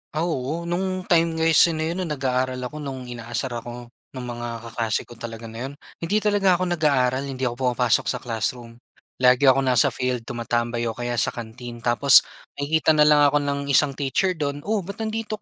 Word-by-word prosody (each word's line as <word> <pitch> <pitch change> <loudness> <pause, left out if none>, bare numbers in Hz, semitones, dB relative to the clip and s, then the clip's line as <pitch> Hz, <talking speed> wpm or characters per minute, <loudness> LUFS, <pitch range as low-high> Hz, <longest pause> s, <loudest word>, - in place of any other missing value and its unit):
Ah, 160 - 0
oo. 160 0 -2
No'ng 185 +2 -2
time 165 -2 +2
kasi 160 +1 +4
na 160 +1 -1
'yon 180 0 -3
nag-aaral 130 -3 -1
ako. 150 +5 -6
No'ng 130 -4 -6
inaasar 120 +2 -4
ako 120 0 -9 0.2
ng 130 - -5
mga 120 0 -5 0.2
kaklase 115 -1 -2
ko 120 - -15
talaga 115 -1 -7
na 120 +4 -5
'yon, 140 - -9 0.3
hindi 185 +6 0
talaga 200 -3 +3
ako 185 - -1
nag-aaral, 135 -5 +1
hindi 130 -1 -5
ako 120 -1 0
pumapasok 120 -2 +2
sa - - -1
classroom. 115 0 -4 0.4
Lagi 130 +2 +5
akong 135 +1 +3
nasa 125 -2 +4
field 125 -2 -2
tumatambay 120 0 -2
o 115 - -2
kaya 120 0 -3
sa - - 0
canteen. 120 +1 -8
Tapos 125 +3 +6 0.3
nakikita 155 +2 +1
na 150 - +3
lang 150 -1 +6
ako 145 +1 +3
ng 140 0 -1
isang 140 0 +2
teacher 160 +6 0
do'n, 145 -1 -3
"Oh, 205 -1 -2
ba't 200 +4 -7
nandito 220 -1 -4
135 Hz, 190 wpm, -23 LUFS, 120-160 Hz, 0.4 s, Tapos